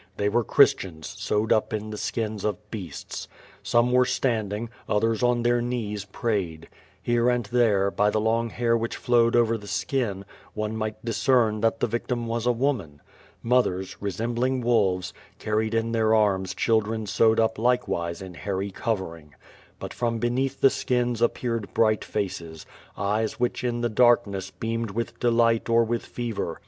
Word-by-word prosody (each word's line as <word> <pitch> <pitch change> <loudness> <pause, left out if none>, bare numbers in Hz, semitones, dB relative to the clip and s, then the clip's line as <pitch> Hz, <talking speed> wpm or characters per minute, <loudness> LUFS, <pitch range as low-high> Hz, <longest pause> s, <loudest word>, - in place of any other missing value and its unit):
They 105 0 +1
were 120 +3 +2
Christians 80 -6 +3
sewed 105 +2 0
up 110 - 0
in 110 0 -4
skins 110 -1 -3
of 105 0 -3
beastt. 100 -6 -6 0.3
Some 120 +1 +2
were 125 0 +5
standing, 110 -3 -1 0.2
others 115 +2 +1
on 120 -1 +2
their 120 0 +2
knees 110 -4 -3
prayed. 95 -7 -3 0.4
Hereknd 120 -2 +1
there, 105 -5 +3
by 105 +1 +2
the 110 - 0
long 115 +2 +1
hair 115 +1 +1
which 115 0 -2
flowed 115 -1 +3
over 115 -1 +3
the 105 - -12
skin, 100 0 -2 0.3
one 110 0 -2
might 110 0 -4
discern 115 -2 +2
that 115 0 +1
the - - +4
victim 120 +1 -2
was 115 +1 -2
a - - +5
woman. 115 - -1 0.4
Mothers, 115 -6 +1
resemBlHig 120 +5 -1
wolves, 100 -6 +1 0.2
carried 110 +1 -1
in 115 0 0
their 110 -1 +3
arms 95 -3 +1
children 110 -1 +1
sewed 110 +3 +3
up 110 -1 +1
likewise 110 -8 0
Un 95 -1 -9
hairy 100 +2 -3
covering. 85 -9 -4 0.4
But - - -7
from 115 -1 -1
beneath 125 +3 -1
the 135 - +6
skins 120 -2 -1
appeared 115 -2 -1
bright 110 -2 +3
faces, 85 -6 -4 0.3
eyes 105 +2 0
wliich 125 0 -1
in 120 -1 -1
the 120 - +1
darkness 115 -4 +2
beamed 115 0 -3
with 115 +4 -4
delight 115 -1 +2
or 115 0 +5
with 115 +1 -2
fever. 115 -8 -4
115 Hz, 155 wpm, -25 LUFS, 105-120 Hz, 0.4 s, the